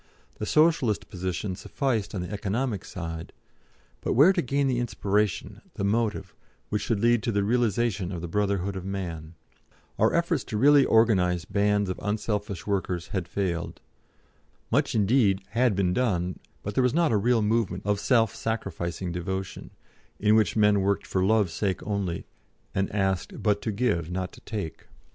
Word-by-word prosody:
The 105 - -3
Socialist 150 -9 +2
position 95 +1 -3
sufficed 110 -2 -2
on 95 - -2
the 90 - -6
economic 105 +1 -2
side, 80 -2 -6 0.7
but - - -1
where 150 +10 +6
to 180 - +1
gain 140 +1 0
the 130 -2 +1
inspiration, 105 -4 -1
the - - -3
motive, 105 -2 0 0.4
which 105 - -1
should 115 -4 0
lead 120 +1 +3
to 120 0 -1
the 100 -1 +1
realisation 110 -3 +1
of 90 - -4
the 85 - -5
Brotherhood 100 +1 -1
of 95 - -5
Man? 85 -4 -5 0.6
Our - - +4
efforts 170 -4 +1
to 105 - -3
really 140 +4 +6
organise 95 -6 +3
bands 100 0 +1
of 90 - -4
unselfish 105 -3 -2
workers 95 -4 -2
had 95 -3 -3
failed. 85 -4 -3 0.9
Much - - +1
indeed 105 -2 +3
had 120 -2 +2
been 90 -2 +1
done, 90 -6 0 0.2
but 100 - -4
there 130 - +2
was 125 +2 +2
not 170 -4 +3
a - - +3
real 115 +2 +2
movement 105 -4 0
of 105 -1 +1
self 115 -3 +3
sacrificing 90 -5 -3
devotion, 95 +2 -4 0.5
in 105 +1 +4
which 110 -1 +3
men 105 -2 +4
worked 100 +1 0
for 95 - 0
Love's 105 -4 +2
sake 95 -1 -1
only, 100 -5 -2 0.5
and 95 0 -1
asked 95 -3 -1
but 105 -2 +2
to 110 - -2
give, 100 -7 0
not 90 0 -3
to - - -15
take. 100 -8 -6
100 Hz, 165 wpm, -26 LUFS, 95-115 Hz, 0.9 s, where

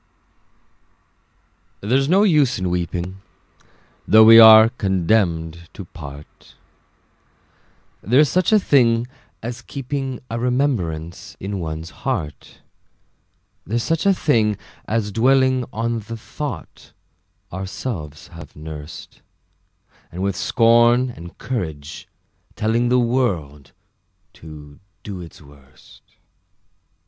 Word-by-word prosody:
There's 130 +7 +1
no 195 +4 +4
use 150 - +3
in 90 -1 -2
weeping, 90 +2 -4 0.9
Though 110 0 +7
we 115 +1 +9
are 110 0 +9
condemned 85 -6 -1
to 100 - -9
part: 75 -3 -13 1.5
There's 130 +9 +3
such 185 +7 +1
a 215 - +6
thing 120 - +2 0.4
as 120 +2 -6
keeping 135 0 -5
A 115 -1 -4
remembrance 115 - -2
in 100 0 -5
one's 80 -1 -6
heart: 95 - -5 1.0
There's 115 +4 -2
such 165 +4 -1
a 195 - +5
thing 110 - +1 0.3
as 110 -2 -1
dwelling 130 +3 +2
On 115 +1 -2
the 115 +2 -8
thought 115 - -8 0.6
ourselves 95 - -6
have 80 -3 -12
nursed, 75 0 -10 0.9
And 90 +3 -5
with 100 -1 -1
scorn 120 +4 +3
and 85 -5 -12
courage 80 - -6 0.5
telling 115 +3 0
The 125 - +3
world 95 - -1 0.6
to 75 -2 -13 0.2
do 95 -3 -7
its 85 -3 -13
worst. 70 -2 -19
110 Hz, 100 wpm, -20 LUFS, 85-125 Hz, 1.5 s, we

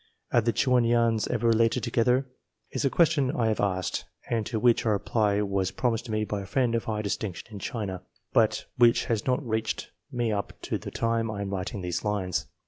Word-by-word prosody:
Are 120 - +4
the 115 +1 +1
Chuan 125 0 +3
Yuans 115 -1 +2
ever - - -1
related 115 +1 +3
together? 125 +4 +2 0.5
is - - -2
a 135 - +3
question 155 -4 +3
I 115 -2 +2
have 110 - -1
asked, 95 -2 -1 0.3
and 115 -3 0
to 115 - -2
which 120 0 +4
a 115 - +1
reply 105 0 +1
was 100 -2 0
promised 120 -1 -1
me 110 0 0
by 105 -1 -3
a - - -7
friend 125 +2 +1
of 115 - 0
high 105 -1 -2
distinction 100 -2 -3
in 105 - -7
China, 100 -5 -4 0.3
but - - +3
which 120 -1 +5
has 115 0 -1
not 125 +1 0
reached 110 -1 -2 0.2
me 120 -3 0
up 100 -1 -2
to - - -2
the - - -6
time 115 -1 0
I 100 -1 -3
am 100 - -4
writing 95 +1 -3
these 90 -1 -2
lines. 100 -4 -1
110 Hz, 210 wpm, -27 LUFS, 100-120 Hz, 0.5 s, which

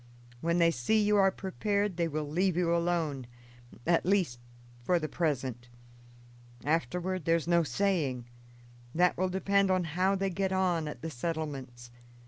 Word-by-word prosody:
When 170 +5 0
they 170 -1 +4
see 165 - +1
you 210 0 +3
are 195 -1 +5
prepared 200 +1 -1
they 170 -1 +1
will 155 -1 -3
leave 175 +3 +1
you 170 -1 +2
alone; 165 -7 -1 0.6
at 170 0 +3
least, 180 -10 +1 0.4
for 175 +8 +2
the 155 -2 -2
present. 130 -7 -2 1.0
Afterward 170 +4 -1
there's 165 0 +1
no 170 0 +4
saying 150 -5 0 0.7
that 180 +2 +3
will 185 +1 0
depend 195 +1 +2
on 185 -1 +2
how 180 +5 +1
they 195 0 -1
get 190 +1 -1
on 180 -4 +1
at 150 - -7
the 165 - -4
settlements. 135 -5 -5
170 Hz, 150 wpm, -30 LUFS, 150-190 Hz, 1.0 s, are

